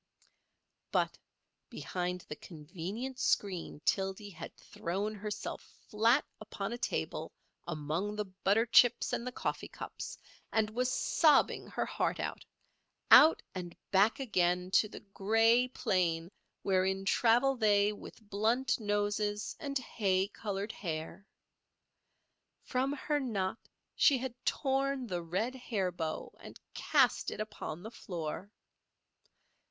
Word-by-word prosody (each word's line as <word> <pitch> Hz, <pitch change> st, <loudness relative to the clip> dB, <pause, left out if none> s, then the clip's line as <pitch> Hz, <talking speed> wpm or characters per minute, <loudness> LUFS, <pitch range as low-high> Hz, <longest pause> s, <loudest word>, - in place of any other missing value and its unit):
But -, -, +1 dB, 0.5 s
behind 180 Hz, 0 st, -3 dB
the 150 Hz, -, -8 dB
convenient 185 Hz, -, -6 dB
screen 185 Hz, -, 0 dB
Tildy 195 Hz, +1 st, 0 dB
had 165 Hz, -2 st, -9 dB
thrown 195 Hz, +5 st, -3 dB
herself 210 Hz, 0 st, -5 dB, 0.3 s
flat 230 Hz, +6 st, +3 dB
upon 210 Hz, 0 st, -5 dB
a -, -, -4 dB
table -, -, -2 dB, 0.4 s
among 170 Hz, +6 st, -2 dB
the 210 Hz, 0 st, -2 dB
butter 195 Hz, +4 st, +1 dB
chips 245 Hz, 0 st, +5 dB
and 235 Hz, -, -2 dB
the -, -, -2 dB
coffee -, -, -3 dB
cups, -, -, -7 dB, 0.3 s
and 220 Hz, -1 st, +1 dB
was 250 Hz, +3 st, 0 dB
sobbing 300 Hz, +2 st, +3 dB
her -, -, -2 dB
heart -, -, -1 dB
out—out 320 Hz, +1 st, +3 dB
and 175 Hz, -2 st, -6 dB
back 200 Hz, +6 st, +4 dB
again 180 Hz, -7 st, +1 dB
to 210 Hz, +2 st, +4 dB
the -, -, -9 dB
grey 225 Hz, +5 st, +3 dB
plain 180 Hz, -9 st, 0 dB, 0.3 s
wherein 190 Hz, 0 st, +1 dB
travel 245 Hz, +6 st, +4 dB
they 210 Hz, -3 st, +3 dB
with 210 Hz, +1 st, -12 dB
blunt 225 Hz, +7 st, +1 dB
noses 205 Hz, 0 st, -1 dB
and 280 Hz, -2 st, -2 dB
hay 195 Hz, -6 st, 0 dB
coloured 205 Hz, 0 st, -4 dB
hair. 170 Hz, +2 st, -5 dB, 1.4 s
From 260 Hz, +1 st, 0 dB
her 295 Hz, +1 st, -1 dB
knot 220 Hz, -6 st, -2 dB, 0.4 s
she 280 Hz, -, +5 dB
had 255 Hz, -1 st, -4 dB
torn 270 Hz, -1 st, 0 dB
the 180 Hz, -6 st, -3 dB
red 190 Hz, +9 st, -2 dB
hair 220 Hz, -8 st, -2 dB
bow 160 Hz, -2 st, -4 dB
and -, -, -11 dB
cast -, -, +2 dB
it -, -, -7 dB
upon 185 Hz, -5 st, -5 dB
the 220 Hz, -, -7 dB
floor. 175 Hz, -1 st, -5 dB
205 Hz, 120 wpm, -32 LUFS, 185-235 Hz, 1.4 s, chips